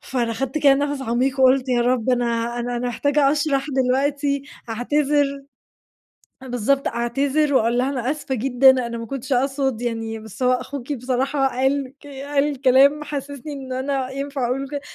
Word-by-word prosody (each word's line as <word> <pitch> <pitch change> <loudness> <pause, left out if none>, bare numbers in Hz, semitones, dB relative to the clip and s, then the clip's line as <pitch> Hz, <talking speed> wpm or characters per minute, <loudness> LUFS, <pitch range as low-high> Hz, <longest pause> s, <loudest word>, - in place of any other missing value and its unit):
فأنا 240 -3 -2
أخَدت 270 +5 -2
كده 280 -2 +5
نَفَس 285 -1 -2
عميق 260 +3 0
وقُلت 260 0 +4
يا 245 -1 +2
رب 250 0 +1
أنا 235 -1 0
أنا 245 0 -3
أنا 245 +1 -2
محتاجة 285 +3 +2
أشرَح 285 -2 0
دلوقتي، 280 +2 0 0.3
أعتذِر 280 +3 0 1.0
بالضبط، 260 +2 0
أعتذِر 275 +5 0
واقول 235 0 +2
لها 260 - +1
أنا 260 -2 -1
آسفة 290 -3 -3
جدًا، 260 +2 +4 0.2
أنا 235 - -5
ما 230 - -6
كنتش 270 +2 -4
أقصُد 265 -2 0
يعني 225 -2 -3
بس 220 +3 -8
هو 250 - +4
أخوكِ 275 +2 -4
بصراحة 265 +2 0
قال 265 +1 -1
ك 290 - -13
قال 280 0 -2
كلام 275 +3 +5
حسّسني 285 0 -6
إن 265 -2 -6
أنا 265 0 -2
ينفَع 275 -1 -3
أقُول 255 +3 -1
له 275 - -5
ك - - -23
265 Hz, 170 wpm, -22 LUFS, 245-280 Hz, 1.0 s, كده